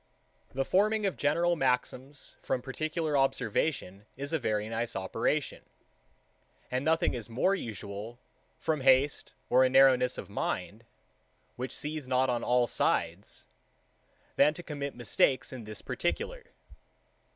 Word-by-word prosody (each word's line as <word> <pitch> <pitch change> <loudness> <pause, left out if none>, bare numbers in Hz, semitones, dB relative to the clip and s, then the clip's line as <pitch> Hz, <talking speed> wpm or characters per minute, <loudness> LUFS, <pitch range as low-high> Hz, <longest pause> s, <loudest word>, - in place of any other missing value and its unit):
6. - - -27
The 135 0 0
forming 210 +2 +2
of 195 - 0
general 170 +4 +2
maxims 130 0 -2
from 125 - -2
particular 155 +3 -2
observation 110 -6 0
is 140 +3 -4
a 160 - +2
very 105 -4 -1
nice 115 +1 -3
operation; 115 +9 -1 1.1
and 130 +1 -1
nothing 160 +2 +2
is 120 -3 -5
more 130 +12 +2
usual, 110 - -6 0.4
from 155 -3 -1
haste 135 +2 +3
or 130 +1 +5
a 130 - +4
narrowness 130 -1 +5
of - - -6
mind, - - -3 0.7
which 125 0 -4
sees 150 -2 -4
not 130 0 +2
on 120 - -1
all 125 0 +3
sides, 90 -4 -1 0.9
than 150 - +5
to 175 - -7
commit 145 -3 -5
mistakes 125 +3 +1
in 120 -4 -7
this 105 0 -6
particular. 465 - -3
130 Hz, 135 wpm, -30 LUFS, 120-155 Hz, 1.1 s, or